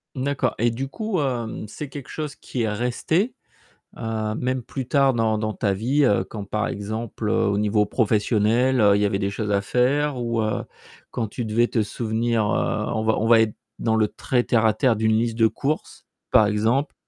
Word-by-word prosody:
D'accord. 135 +1 -1
Et 120 +2 +2
du 130 +4 -4
coup, 215 - -2
hem, 120 -6 -3
c'est 145 +7 -7
quelque 135 -1 -9
chose 150 -2 -5
qui 125 - -4
est 110 - 0
resté, 125 - 0 0.6
heu, 110 -2 -2
même 130 +1 -1
plus 130 +1 -6
tard 135 -1 +3
dans 110 -2 +1
dans 110 0 -2
ta 100 -2 0
vie, 130 +8 +1
heu, 100 -4 +3
quand 105 +1 -7
par 105 +1 -1
exemple, 110 +2 -4
heu, - - +2
au 100 - +1
niveau 105 0 +2
professionnel, 115 +3 +2
heu, 100 -2 +5
il 100 - +1
y - - +3
avait 100 -1 0
des 100 -1 0
choses 105 +1 -3
à 100 - +3
faire 135 +7 +1
ou, 115 -2 -1
heu, 110 -1 -1 0.5
quand 115 -2 -2
tu 120 - -5
devais 115 +2 +2
te 115 - 0
souvenir, 115 +1 -1
heu- 105 - 0
on 110 - -1
va 110 0 +2
on 110 - 0
va 115 -1 +6
être 110 -2 0 0.2
dans 110 -1 +1
le 110 -1 +3
très 125 +3 -1
terre-à-terre- 110 +1 +3
d'une 110 0 +2
liste 115 0 0
de 115 -1 +5
courses, 145 +7 -4 0.3
par 105 - +6
exemple? 110 +7 +1
115 Hz, 205 wpm, -23 LUFS, 105-130 Hz, 0.6 s, va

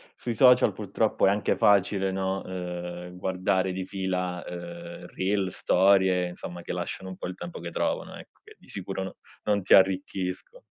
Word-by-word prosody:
Sui 120 - -4
social, 125 -2 +6
purtroppo, 105 +1 +1
è - - +6
anche 100 +1 +1
facile, 100 -1 +3
no, 95 0 -1
uhm, 90 -1 -6
guardare 95 0 0
di 95 0 -4
fila, 90 -2 -2
uhm, 85 0 -8
reels, 95 0 0
storie, 95 -1 +4
insomma, 90 0 -8
che - - -4
lasciano 95 - -4
un 95 - -7
po' - - -5
il 90 - -6
tempo 85 -1 -7
che 85 0 -6
trovano, - - -2
ecco, - - -14
che - - -16
di - - -22
sicuro 95 0 -4
no 95 - -7 0.3
non 105 -1 +1
ti 95 - +6
arricchisco 95 - 0
95 Hz, 175 wpm, -27 LUFS, 90-95 Hz, 0.3 s, social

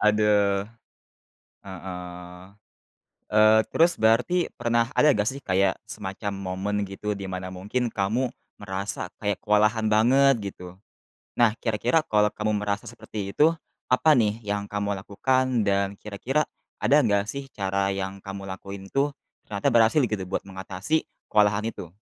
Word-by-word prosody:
Aduh! 105 -2 +3 1.0
Heeh. 90 -1 -8 0.9
Eee, 110 +1 +6
terus 170 +2 +4
berarti 120 +11 +3
pernah 115 0 +1
ada 150 -1 +6
nggak 105 -2 0
sih, 135 +1 -6
kayak 95 -1 +2
semacam 100 +1 -5
momen 95 +1 -3
gitu, 100 +2 -4
di 100 -1 -6
mana 95 0 -4
mungkin 105 +7 -2
kamu 110 +6 0 0.3
merasa 100 0 -4
kayak 105 -1 -1
kewalahan 105 +1 +3
banget 120 -1 +4
gitu? 90 0 -11 0.6
Nah, 120 -3 +5
kira-kira 120 +8 +1
kalau 105 0 +3
kamu 105 -1 -1
merasa 100 0 -2
seperti 105 -2 -6
itu, 155 +2 +5 0.4
apa 155 +5 +5
nih 110 -2 +1
yang 100 0 -2
kamu 100 0 -1
lakukan, 125 +4 0
dan 100 0 +1
kira-kira, 125 +9 -1 0.4
ada 145 - +5
enggak 100 -2 +1
sih 140 0 -5
cara 100 0 0
yang 95 0 -4
kamu 100 0 -6
lakuin 95 +1 -8
itu, 140 +1 +1 0.3
ternyata 100 -1 -2
berhasil 115 +6 +5
gitu 105 -6 -1
buat 90 - -2
mengatasi, 95 +9 -2 0.3
kewalahan 105 -1 +3
itu? 85 -6 -9
105 Hz, 140 wpm, -25 LUFS, 100-115 Hz, 1.0 s, Eee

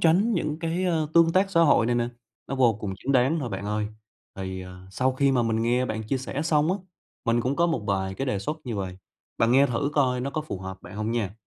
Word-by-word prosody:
tránh 185 +8 +4
những 155 -2 -1
cái, 165 +3 -1
ờ, 160 -4 +1
tương 165 -1 +6
tác 195 +2 +3
xã 170 -3 +3
hội 145 -8 +5
này 120 - +1
nè, 120 0 +1 0.4
nó 135 - -3
vô 125 -4 +4
cùng 100 -2 -3
chính 140 - -1
đáng 130 +6 +3
thôi, 125 - -3
bạn 100 - -5
ơi. 105 0 -1 0.5
Thì, 95 -1 -4
ờ, 90 0 -11
sau 130 +6 +1
khi 135 +1 +2
mà 125 -2 +3
mình 115 0 0
nghe 125 +2 +2
bạn 110 -1 -3
chia 130 +5 -1
sẻ 135 +3 -4
xong 160 +1 +2
á, 200 - -2 0.5
mình 115 0 +2
cũng 130 +4 -1
có 170 +1 +3
một 160 -10 -1
vài 95 -1 -1
cái 135 - -3
đề 125 -6 0
xuất 150 +10 -3
như 120 -4 -3
vầy, 95 -2 -4 0.4
bạn 115 +1 +3
nghe 140 +2 +6
thử 140 +4 -1
coi 130 -4 +2
nó 135 +2 -2
có 155 - -2
phù 150 -11 -5
hợp 95 0 -7
bạn 105 - -10
hông 105 +1 -2
nha. 110 -4 -1
125 Hz, 265 wpm, -26 LUFS, 105-155 Hz, 0.5 s, tương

